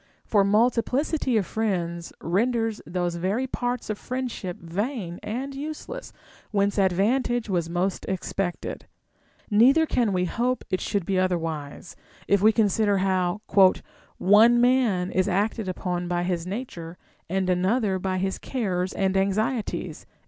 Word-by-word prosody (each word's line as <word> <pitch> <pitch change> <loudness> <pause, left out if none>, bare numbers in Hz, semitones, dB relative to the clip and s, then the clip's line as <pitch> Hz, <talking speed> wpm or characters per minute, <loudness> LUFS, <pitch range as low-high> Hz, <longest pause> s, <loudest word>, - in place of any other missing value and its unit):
For 205 -2 +3
multi 230 +4 +3
plicity 265 -1 0
of 200 - +1
friends 170 -6 -2
renders 225 +5 0
those 175 0 -2
very 195 +9 0
parts 245 -1 -3
of 215 -1 -3
friendship 250 -8 -4
vain 185 +1 -4
and 260 +6 -4
useless 310 - -6 0.4
Avhence 200 -1 +2
advantage 225 +5 +1
was 170 -3 0
most 180 +2 -1
expected; 190 -1 -3 0.6
neither 265 +10 +5
can 240 -8 +1
we 180 -1 +1
hope 245 +6 -1
it 185 - 0
should 200 -5 -1
be 190 0 +1
otherwise, 165 -5 -3 0.3
if 200 -1 +3
we 215 +2 +6
consider 210 -2 +2
how 185 0 0 0.4
" - - -30 0.2
one 220 +5 +6
man 240 -8 +2
is 185 +1 +1
acted 205 +2 0
upon 180 -1 -3
by 175 0 0
his 175 -1 -2
nature 180 -6 -6 0.3
and 190 +1 0
another 190 +2 +1
by 185 0 -1
his 190 +1 -2
cares 190 -8 -2
and 190 -1 0
anxieties." 210 +4 -1
200 Hz, 140 wpm, -25 LUFS, 180-235 Hz, 0.6 s, we